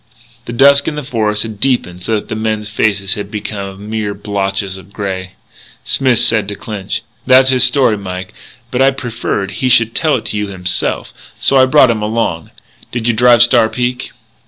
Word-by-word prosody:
The -, -, -6 dB
dusk 140 Hz, +3 st, +5 dB
in 155 Hz, -, -2 dB
the 150 Hz, -, -4 dB
forest 110 Hz, -5 st, -1 dB
had 110 Hz, -3 st, -8 dB
deepened 100 Hz, -9 st, 0 dB
so 110 Hz, +5 st, -1 dB
that 105 Hz, -, -4 dB
the -, -, -5 dB
men's 110 Hz, -1 st, -2 dB
faces 100 Hz, -3 st, 0 dB
had 105 Hz, -3 st, -5 dB
become 100 Hz, -1 st, -6 dB
mere 105 Hz, -2 st, -3 dB
blotches 100 Hz, -1 st, -3 dB
of 95 Hz, 0 st, -13 dB
grey. 95 Hz, -2 st, -5 dB, 0.5 s
Smith 130 Hz, -3 st, +1 dB
said 110 Hz, -3 st, +2 dB
to 100 Hz, -, -5 dB
Clinch: 100 Hz, -2 st, -5 dB, 0.2 s
"That's 130 Hz, +1 st, +6 dB
his 130 Hz, -1 st, +4 dB
story, 125 Hz, -4 st, +2 dB
Mike. 95 Hz, -1 st, -7 dB, 0.4 s
But 125 Hz, -, 0 dB
I 135 Hz, -, +6 dB
preferred 115 Hz, -6 st, -3 dB
he 130 Hz, -, -1 dB
should 115 Hz, -2 st, +3 dB
tell 155 Hz, -2 st, +1 dB
it 120 Hz, -, -4 dB
to 105 Hz, -, -3 dB
you 105 Hz, 0 st, -2 dB
himself, 90 Hz, -2 st, -2 dB, 0.3 s
so 135 Hz, -, +3 dB
I 130 Hz, 0 st, +5 dB
brought 130 Hz, -3 st, +5 dB
him 110 Hz, -2 st, -2 dB
along.... 105 Hz, -6 st, -2 dB, 0.4 s
Did 120 Hz, -1 st, -3 dB
you 120 Hz, -, +3 dB
drive 120 Hz, +1 st, +5 dB
Star 120 Hz, -2 st, +3 dB
Peak?" 125 Hz, +2 st, -3 dB
110 Hz, 190 wpm, -15 LUFS, 100-125 Hz, 0.5 s, That's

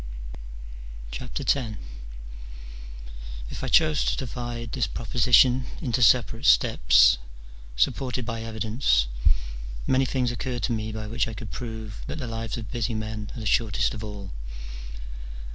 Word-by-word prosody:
X. 125 Hz, -, -5 dB, 2.2 s
If -, -, -6 dB
I -, -, -1 dB
chose 155 Hz, +2 st, +4 dB
to -, -, +1 dB
divide 120 Hz, -2 st, -4 dB
this 125 Hz, -6 st, 0 dB
proposition 125 Hz, +3 st, +4 dB
into 125 Hz, -3 st, -1 dB
separate 115 Hz, +2 st, +4 dB
steps, -, -, +6 dB, 0.6 s
supported 125 Hz, -, 0 dB
by 115 Hz, -1 st, -3 dB
evidence, 110 Hz, -, +1 dB, 0.8 s
many 130 Hz, 0 st, +3 dB
things 125 Hz, -2 st, 0 dB
occur 125 Hz, +1 st, -3 dB
to 120 Hz, -, -1 dB
me 110 Hz, -1 st, -2 dB
by 110 Hz, 0 st, -5 dB
which 115 Hz, +3 st, 0 dB
I 115 Hz, -, -6 dB
could 105 Hz, -1 st, -7 dB
prove 110 Hz, -3 st, -6 dB
that -, -, -4 dB
the 140 Hz, -, -4 dB
lives 115 Hz, +1 st, -4 dB
of 110 Hz, -4 st, -7 dB
busy 115 Hz, -1 st, -1 dB
men 110 Hz, -1 st, -4 dB
are -, -, -5 dB
the 110 Hz, -, -5 dB
shortest 105 Hz, 0 st, +2 dB
of 110 Hz, -, -6 dB
all. 100 Hz, -3 st, -7 dB
115 Hz, 135 wpm, -26 LUFS, 110-125 Hz, 2.2 s, steps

